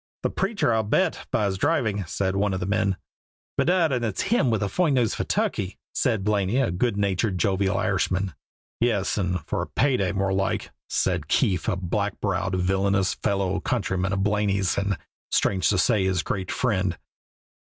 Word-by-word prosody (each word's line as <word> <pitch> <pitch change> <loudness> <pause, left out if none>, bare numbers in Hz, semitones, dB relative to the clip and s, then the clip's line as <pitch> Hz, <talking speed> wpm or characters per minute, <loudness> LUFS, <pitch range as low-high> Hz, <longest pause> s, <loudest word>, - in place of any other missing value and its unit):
"The - - 0
preacher, 195 - 0
I'll 110 - +3
bet, 105 - 0
by 105 - +1
his 95 -1 -1
driving," 120 -10 +1
said 95 +4 -1
one 100 -1 +1
of - - -3
the 90 - -2
men. 100 -1 +1 0.6
"Bedad, 175 -3 +3
and 125 -2 0
it's 110 -4 -1
him 195 - +2
has 110 -2 +1
the 100 - 0
foine 160 - +1
nose 120 -4 +2
for - - -2
turkey!" 95 +1 -1 0.2
said 115 -7 +1
Blaney, 105 +1 +1
a 135 -7 +2
good 100 +4 0
natured, 100 0 0
jovial 95 +2 +1
Irishman. 95 -2 0 0.5
"Yes, 110 -4 +1
or 90 -4 -1
for - - -1
pay 135 -1 +2
day, 95 -2 0
more 95 -1 0
like," 95 0 -1 0.2
said - - 0
Keefe, 90 -4 +1
a - - +2
black 95 +3 -2
browed, 95 -2 -1
villainous 95 +1 +1
fellow 100 -1 -1
countryman 95 -8 -1
of 95 0 0
Blaney's 100 -2 +1
and, 100 -2 0 0.3
strange 95 -2 +2
to 100 - +2
say, 105 +1 +3
his 95 -2 +1
great 95 -1 -3
friend. 95 -7 0
100 Hz, 180 wpm, -25 LUFS, 95-110 Hz, 0.6 s, I'll